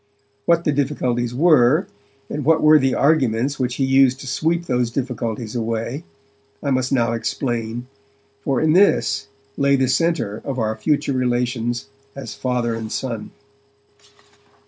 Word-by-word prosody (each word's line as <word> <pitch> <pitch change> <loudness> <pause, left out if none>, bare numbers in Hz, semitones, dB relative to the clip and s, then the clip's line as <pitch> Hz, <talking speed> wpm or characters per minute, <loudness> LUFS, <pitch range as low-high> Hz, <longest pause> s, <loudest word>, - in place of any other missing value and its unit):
What 170 0 +3
the 150 - +1
difficulties 125 -4 -1
were, 155 +1 +4 0.4
and 150 - -4
what 160 +3 +3
were 155 0 +7
the 135 -1 +1
arguments 140 -2 +1
which 125 -1 -1
he 135 - 0
used 135 -1 +4
to - - -9
sweep 165 +5 0
those 125 -5 0
difficulties 120 -3 -4
away, 115 +6 -3 0.6
I 140 - 0
must 130 -1 0
now 120 -4 +2
explain, 115 0 -3 0.6
for 135 -3 0
in 155 0 +2
this 185 -6 +3 0.3
lay 140 0 +3
the 130 -1 +1
centre 130 -6 0
of 135 -2 -4
our 110 -2 -1
future 145 0 0
relations 120 -1 -1 0.3
as 140 - -7
father 125 -2 -1
and 110 -1 -5
son. 115 -5 -4
130 Hz, 145 wpm, -21 LUFS, 120-145 Hz, 0.6 s, were